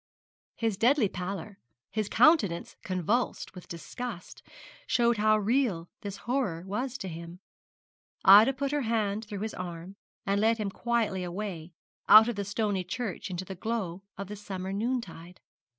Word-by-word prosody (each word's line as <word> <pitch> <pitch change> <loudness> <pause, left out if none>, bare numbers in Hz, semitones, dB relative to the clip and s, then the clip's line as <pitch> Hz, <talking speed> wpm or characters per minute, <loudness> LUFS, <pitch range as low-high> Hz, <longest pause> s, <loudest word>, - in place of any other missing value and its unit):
His 225 -4 -1
deadly 240 +1 +4
pallor, 190 +2 -6 0.3
his 215 -2 -2
countenance 210 - +3
convulsed 190 +7 -1
with 180 -2 -11
disgust, 195 +3 -7 0.5
showed 235 -1 +3
how 215 +1 +4
real 215 -6 0
this 200 -1 -6
horror 240 -10 -1
was 245 +7 -3
to 190 - -6
him. 170 +1 -8 0.9
Ida 210 +7 +9
put 275 +1 -2
her 295 0 0
hand 220 -2 -1
through 205 -2 -6
his 220 0 -3
arm, 175 +1 -7 0.3
and 200 +1 +1
led 225 +1 +3
him 210 -3 -2
quietly 225 -5 -1
away, 175 -2 -5 0.4
out 220 +2 +10
of 240 - -1
the 200 - -2
stony 205 -2 -1
church 210 +2 -4
into 180 0 -4
the 190 - -6
glow 190 -2 -3 0.2
of 200 - -4
the 210 - -6
summer 190 -2 -5
noontide. 200 -6 -4
205 Hz, 150 wpm, -29 LUFS, 185-230 Hz, 0.9 s, out